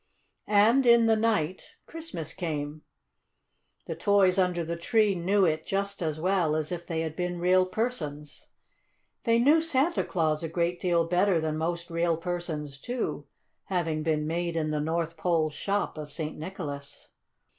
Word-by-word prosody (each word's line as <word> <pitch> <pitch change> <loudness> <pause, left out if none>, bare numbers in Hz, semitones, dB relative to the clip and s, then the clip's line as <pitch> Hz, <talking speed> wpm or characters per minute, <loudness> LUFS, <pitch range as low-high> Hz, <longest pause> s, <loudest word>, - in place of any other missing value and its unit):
And 225 +6 +4
in 235 -1 +7
the 225 0 +4
night 210 -6 -1
Christmas 245 - -6
came. 150 -3 -4 1.0
The - - -4
toys 200 -2 +3
under 180 -2 +1
the 170 +1 -3
tree 210 +4 +2
knew 190 +2 +2
it 155 -1 0
just 200 0 -2
as 155 -2 -2
well 175 -3 +1
as 155 +1 -2
if 175 -1 -5
they 165 -1 -1
had 160 -1 -4
been 180 0 -2
real 185 +1 +3
persons. 155 -10 -4 0.8
They 230 -1 +4
knew 290 +7 +5
Santa 325 +1 +1
Claus 155 -4 0
a 165 - -3
great 170 +1 -1
deal 170 -2 +2
better 180 +1 +2
than 155 -1 -1
most 170 +2 -3
real 170 0 +1
persons, 165 -5 -4
too, 245 - -4 0.4
having 165 -4 -1
been 155 -1 0
made 170 +1 -2
in 155 -2 0
the 150 -1 -1
North 165 +1 -2
Pole 160 -2 +1
shop 200 +1 -2
of 150 -1 -7
St. 155 +1 -4
Nicholas. 150 -5 -7
170 Hz, 160 wpm, -28 LUFS, 155-195 Hz, 1.0 s, in